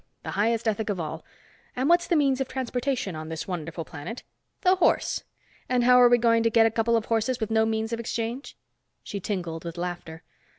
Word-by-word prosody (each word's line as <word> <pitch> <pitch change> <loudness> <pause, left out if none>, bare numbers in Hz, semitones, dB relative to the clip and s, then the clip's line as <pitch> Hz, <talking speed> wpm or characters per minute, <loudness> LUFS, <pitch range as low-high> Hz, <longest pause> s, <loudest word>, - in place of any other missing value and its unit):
The - - -5
highest 225 +2 0
ethic 220 0 -1
of 195 -3 -1
all. 160 0 -5 0.5
And 255 +2 0
what's 345 +1 +4
the 345 - +2
means 275 -3 +2
of 265 - -1
transportation 250 - -2
on 155 0 -6
this 160 -1 -5
wonderful 165 -2 -5
planet? 160 +13 -8 0.4
The 370 0 +4
horse. 360 - +1 0.4
And 250 -1 +2
how 250 0 +6
are 245 - +7
we 245 - +6
going 230 -1 +3
to 230 - +3
get 225 0 +5
a 225 - +3
couple 230 +1 +2
of 225 - -2
horses 230 +2 0
with 220 -1 -3
no 220 0 +3
means 220 +1 -1
of 230 - -2
exchange?" 235 +3 -4 0.5
She 200 - -5
tinkled 170 -4 -4
laughter. 175 -2 -5
225 Hz, 205 wpm, -26 LUFS, 180-245 Hz, 0.5 s, are